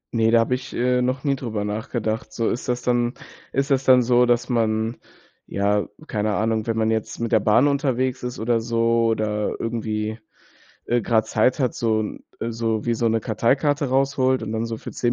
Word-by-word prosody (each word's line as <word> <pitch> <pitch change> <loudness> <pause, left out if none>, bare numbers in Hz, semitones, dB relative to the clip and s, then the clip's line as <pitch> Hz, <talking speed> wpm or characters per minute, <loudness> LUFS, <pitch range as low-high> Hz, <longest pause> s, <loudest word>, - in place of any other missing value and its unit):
Ne, 115 0 +3
da 115 0 +5
habe 115 +2 0
ich, 130 +1 -4
äh, 125 +1 +2
noch 130 +1 -1
nie 140 -2 +1
drüber 110 -5 -4
nachgedacht. 110 +1 -3
So 115 +1 -1
ist 125 - -4
das 125 0 -1
dann 120 0 +1 0.4
ist 140 +2 -1
das 135 0 +3
dann 130 -2 +6
so, 125 0 +4
dass 120 -1 +2
man 115 -1 0 0.5
ja, 100 +1 0 0.2
keine 105 -1 -1
Ahnung, 110 0 0
wenn 115 -1 -1
man 110 0 +2
jetzt 110 -1 -2
mit 115 +1 -2
der 110 - +5
Bahn 115 +7 +4
unterwegs 130 -2 0
ist 125 0 -5
oder 115 0 +1
so 115 0 +1
oder 105 -1 -1
irgendwie, 110 -1 -3 0.7
äh, 120 -1 +1
grade 110 -1 +2
Zeit 125 +6 +2
hat, 130 -3 0
so 110 -2 +1
'n, 105 - -5 0.2
äh, 115 - -2
so 115 -1 -1
wie 120 - +2
so 115 +1 0
'ne 115 0 +2
Karteikarte 135 +7 +1
rausholt 130 -2 +2
und 110 - -5
dann 110 +1 -1
so 115 -1 -4
für - - -8
10 120 -1 0
115 Hz, 205 wpm, -23 LUFS, 110-125 Hz, 0.7 s, dann